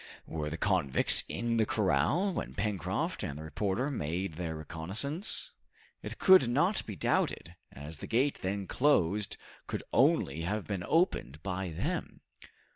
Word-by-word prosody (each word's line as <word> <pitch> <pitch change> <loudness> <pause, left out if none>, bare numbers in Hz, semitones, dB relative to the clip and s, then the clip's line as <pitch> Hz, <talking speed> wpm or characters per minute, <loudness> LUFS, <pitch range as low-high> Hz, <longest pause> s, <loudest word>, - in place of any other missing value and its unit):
Were 75 -2 -4
the 80 - -5
convicts 90 -9 +5
in 115 0 -1
the 110 - +3
corral 155 - +1
when - - -5
Pencroft 100 -3 -2
and 70 - -4
the 80 - -7
reporter 100 - -2
made 85 - -3
their 80 0 -4
reconnaissance? 95 - -5 0.5
It - - -7
could 185 - +6
not 175 - +2
be 105 - -5
doubted, 85 +1 -1 0.2
as 75 +3 -9
the - - -7
gate 130 +5 +1
then 100 +1 -2
closed 105 - +1 0.3
could - - -4
only 70 +4 +3
have 100 +5 -2
been 100 -4 -3
opened 85 - 0
by 95 -1 -3
them. 80 - -4
95 Hz, 145 wpm, -31 LUFS, 80-120 Hz, 0.5 s, could